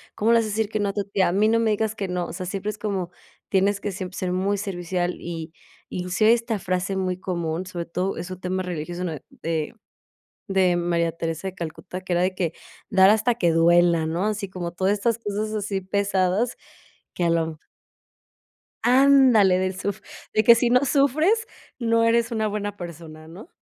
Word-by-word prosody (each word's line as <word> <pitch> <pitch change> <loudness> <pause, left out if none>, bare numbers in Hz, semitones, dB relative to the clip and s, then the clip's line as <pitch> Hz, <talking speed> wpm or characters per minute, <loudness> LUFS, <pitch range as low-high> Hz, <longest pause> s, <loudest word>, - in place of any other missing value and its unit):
¿Cómo 225 +3 +2
le 235 - +6
vas 225 - 0
a - - -3
decir 215 0 -1
que 215 - -2
no 205 -1 0
a 195 - -3
tu 205 - -1
tía? 195 -1 +1
A - - +1
mí 210 +3 +3
no 230 - +3
me 225 -1 +2
digas 215 +1 0
que 200 -2 -4
no". 180 -1 -2
O - - -8
sea, 185 +1 -5
siempre 200 +3 -3
es 215 - -12
como 195 -4 -3 0.4
tienes 200 +1 +2
que 205 - -3
siempre 185 0 -6
ser 180 -1 -2
muy 195 +3 0
servicial 180 -2 -2
y 165 -1 -6 0.4
inclusive 185 +5 +2
esta 230 -1 -1
frase 185 0 -2
muy 185 -1 -2
común, 170 -1 -3
sobre 175 -2 -5
todo, 180 +3 -2
es 175 +2 -6
un 185 - -7
tema 185 0 -2
religioso 175 0 -4
na 160 -5 -3
de 160 -2 -4 0.8
de 185 -2 +3
María 170 -1 0
Teresa 165 +2 -4
de 190 - -5
Calcuta, 180 +1 -7
que 185 -1 -7
era 175 +1 +2
de 185 +1 +1
que 175 -3 -2 0.4
dar 190 0 +6
hasta 220 +2 +2
que 175 -7 +2
duela, 170 0 +4
¿no? 170 +5 -1
Así 210 -2 -2
como 175 -2 -5
todas 190 +3 +1
estas 230 +2 0
cosas 215 0 -3
así 205 -2 -2
pesadas, 200 +3 0 0.6
que 180 - -2
a - - +3
lo 165 -1 +2
m 160 -1 -6 1.3
Ándale 250 -6 +5
del 185 0 -2
suf 205 +1 -3 0.3
de 215 - +3
que 235 +2 +8
si 240 +1 +2
no 250 +3 +4
sufres, 310 - +2 0.3
no 230 -1 +2
eres 230 +1 +2
una 220 -1 0
buena 205 -1 -4
persona, 160 -2 -9
¿no? 185 - -12
190 Hz, 205 wpm, -24 LUFS, 175-215 Hz, 1.3 s, que